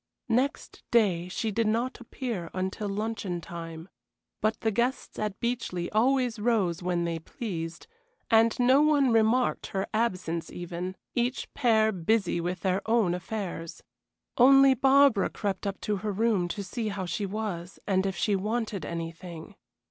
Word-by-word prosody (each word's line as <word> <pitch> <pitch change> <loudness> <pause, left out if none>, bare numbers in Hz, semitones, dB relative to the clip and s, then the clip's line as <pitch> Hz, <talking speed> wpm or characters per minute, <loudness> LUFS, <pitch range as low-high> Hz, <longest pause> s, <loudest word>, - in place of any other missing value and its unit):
Next 255 +5 -1
day 190 -7 +3
she 215 +4 -2
did 225 +2 +1
not 235 +4 0
appear 230 -8 -5
until 190 +3 -2
luncheon 205 -3 -3
time. 165 0 -8 0.5
But 215 +1 0
the 220 - +1
guests 240 +5 -1
at 210 -2 -3
Beechleigh 235 -8 -2
always 245 +1 +2
rose 205 -7 +1
when 175 -1 0
they 165 -1 -2
pleased, 165 -2 -6 0.5
and 225 +1 +4
no 255 +3 +5
one 290 -4 +4
remarked 225 +3 +2
her 195 0 -2
absence 185 -7 -1
even, 175 +1 -5 0.2
each 245 +2 -1
pair 220 -5 +3
busy 185 -1 +1
with 180 +1 -3
their 190 0 +1
own 225 -6 +3
affairs. 180 -3 -5 0.6
Only 270 +2 +8
Barbara 270 -4 +4
crept 200 -1 -3
up 195 - -3
to 210 -1 -1
her 210 +2 -3
room 205 -3 +1
to 200 +4 -4
see 220 +4 -4
how 200 -3 -3
she 200 +3 -2
was, 195 -4 -4
and 190 -1 +1
if 190 - -2
she 205 - +1
wanted 215 0 -2
anything. 165 0 -6
210 Hz, 150 wpm, -28 LUFS, 180-235 Hz, 0.6 s, Only